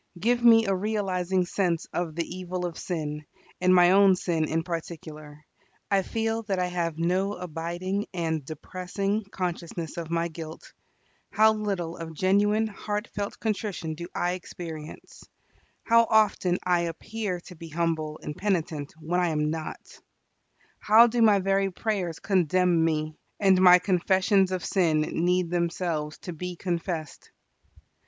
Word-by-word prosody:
Give 240 +5 +1
me 225 -1 +7
a 195 - +1
realizing 190 -2 0
sense 175 -3 -1
of 170 -3 -2
the 170 -1 -1
evil 180 0 -4
of 170 -2 -4
sin, 150 -4 -4 0.4
and 185 0 +4
my 180 -1 +6
own 195 0 +6
sin 170 -3 -1
in 160 +1 -1
particular. 155 -3 -7 0.5
I 195 -1 +4
feel 225 +3 -2
that 195 -2 0
I 180 - +1
have 170 -3 -2
no 185 +4 0
abiding 180 +4 -4
and 160 -4 -2
depressing 185 +7 -3
consciousness 175 -4 -5
of 165 -2 -5
my 170 0 0
guilt. 160 -1 -9 0.6
How 220 +2 +5
little 195 -6 -3
of 165 -1 -7
genuine, 205 +5 +2
heartfelt 205 -1 -4
contrition 205 -7 -2
do 170 +2 -7
I 175 - 0
experience! 165 -3 -8 0.6
How 230 0 +5
often 205 -4 +3
I 180 -1 +2
appear 180 +3 -3
to 180 - -12
be 165 0 -10
humble 160 -1 -2
and 150 - -5
penitent 165 -7 -2
when 165 +3 -1
I 180 - +2
am 150 -2 0
not! 160 -1 -7 0.8
How 220 +3 +7
do 240 0 0
my 215 -3 +6
very 195 0 +1
prayers 185 -4 -2
condemn 180 -2 +2
me; 155 -1 -1 0.2
and 190 -2 +4
my 180 -1 +9
confessions 190 +1 +2
of 185 -2 -2
sin 165 -5 +2
need 175 +2 0
themselves 170 -3 -1
to 180 - -5
be 180 +2 -5
confessed! 170 -3 -4
180 Hz, 145 wpm, -27 LUFS, 165-195 Hz, 0.8 s, my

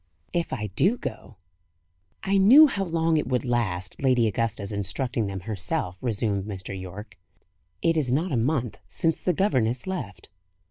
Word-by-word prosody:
"If 170 -1 -1
I 115 -5 -3
do 195 - +3
go." 120 - -7 0.9
"I 195 0 +2
knew 255 +11 +9
how 200 -9 -1
long 165 -1 +1
it 150 - -1
would 125 -1 -1
last, 95 -7 -2
Lady 130 -4 +3
Augusta's 110 -1 -2
instructing 105 +3 +1
them 95 -1 -5
herself," 100 - -3
resumed 105 -5 -1
Mr. 100 -2 -6
Yorke. 95 +3 -9 0.6
"It 165 -1 +3
is 145 -6 0
not 160 +7 0
a - - 0
month 120 0 -1
since 165 -2 -1
the 180 - +1
governess 130 - +1
left." 140 - -6
120 Hz, 155 wpm, -25 LUFS, 105-165 Hz, 0.9 s, knew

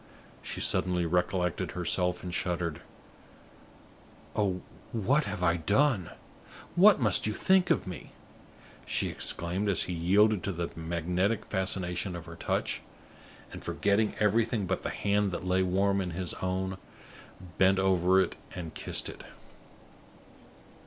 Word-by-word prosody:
She - - -5
suddenly 90 -1 +2
recollected 90 0 0
herself, 90 0 +1
and 90 -1 -5
shuddered. 85 -3 -2 1.5
"Oh, 95 -4 0 0.3
what 130 +7 +1
have 100 -2 -4
I 85 -1 +3
done? 100 - +2 0.7
What 195 +1 +7
must 110 -4 +3
you 105 - -1
think 190 -1 +3
of - - +2
me?" 90 -4 -8 0.8
she - - 0
exclaimed, 90 +5 -1
as 95 - +2
he 90 - -4
yielded 100 +4 +3
to 100 - -2
the 85 -1 -4
magnetic 85 +6 -1
fascination 95 -1 -2
of 85 -1 -7
her 85 0 -10
touch, - - -2 0.7
and, - - -9
forgetting 105 +1 +1
everything 110 0 +2
but 95 +1 -2
the - - -3
hand 100 0 0
that 90 - -4
lay 90 +1 +2
warm 95 +2 +1
in 90 - -3
his 90 -3 -3
own, 95 0 -2 0.8
bent 95 0 +5
over 95 -1 +3
it 95 - 0 0.2
and 85 -3 -6
kissed - - -1
it. - - -9
95 Hz, 135 wpm, -29 LUFS, 90-100 Hz, 1.5 s, What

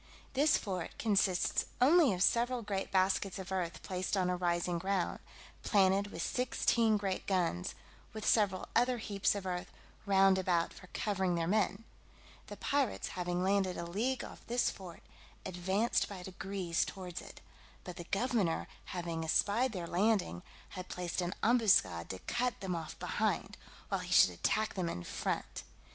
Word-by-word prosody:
This 280 +2 +4
fort 185 -5 -4
consists 195 -4 +2
only 295 +1 +6
of 185 -1 +1
several 240 +1 +2
great 195 -2 -3
baskets 190 0 +1
of 190 0 -7
earth 180 -3 -2
placed 185 +1 -2
on 180 -1 +2
a - - +1
rising 175 -1 0
ground, 190 -1 -1 0.4
planted 195 -1 +3
with 170 -4 -5
sixteen 235 -3 +2
great 195 -2 -3
guns, 175 - 0 0.4
with 215 -1 -6
several 200 -4 +2
other 245 0 +3
heaps 205 -3 0
of 200 -2 -5
earth 180 -1 -3 0.4
round 195 -1 +5
about 175 -2 +1
for 185 - -13
covering 190 -2 -1
their 165 -1 0
men: 200 +2 +1 0.6
the - - -8
pirates 280 -5 0
having 180 0 -2
landed 190 -1 +1
a 170 - -4
league 230 +10 -1
off - - -10
this 240 +1 +1
fort, 180 -3 -11 0.4
advanced 190 +5 0
by 190 -3 -7
degrees 185 -2 -2
towards 180 -2 -6
it; - - -12 0.4
but 180 -1 -8
the 175 - -7
governor 200 -4 0 0.2
having 170 -2 -4
espied 210 +10 +2
their 180 -5 -4
landing, 180 - +1 0.3
had 185 -1 -8
placed 180 0 -3
an 175 +1 -3
ambuscade 215 - +3
to 95 - -4
cut 245 0 -1
them 185 -2 -3
off 160 -2 -6
behind, - - -1 0.3
while - - -1
he - - -7
should 90 - +7
attack 215 - 0
them 180 -3 -2
in 85 - -5
front. - - -3
190 Hz, 160 wpm, -33 LUFS, 180-215 Hz, 0.6 s, should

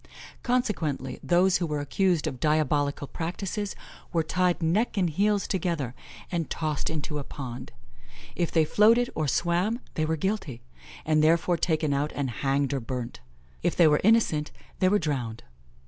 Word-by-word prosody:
Consequently, 175 - -1
those 180 +2 +3
who 175 - -2
were 150 -1 -2
accused 170 +3 +1
of 130 - -4
diabolical 145 -1 +1
practices, 185 +6 -4 0.4
were 165 -2 +1
tied 180 +2 +1
neck 205 +8 +1
and 180 -4 +2
heels 200 +4 +1
together, 165 - -1 0.4
and 170 -3 -2
tossed 155 -3 -2
into 150 -1 -3
a - - -4
pond; 130 -4 -7 0.6
if 170 - -1
they 160 -2 +3
floated 230 +8 +4
or 155 -2 -1
swam 175 - +1
they 155 - -1
were 160 +1 0
guilty, 150 - -3 0.4
and 155 0 +3
therefore 170 +2 +3
taken 155 -3 0
out 145 +2 0
and 135 -3 -2
hanged 140 0 +1
or 135 - 0
burnt; 125 0 -5 0.4
if 175 - 0
they 170 - +6
were 150 -1 +3
innocent, 190 -9 +3 0.3
they 185 -1 +4
were 205 - +4
drowned. 130 - -3
160 Hz, 160 wpm, -27 LUFS, 145-185 Hz, 0.6 s, they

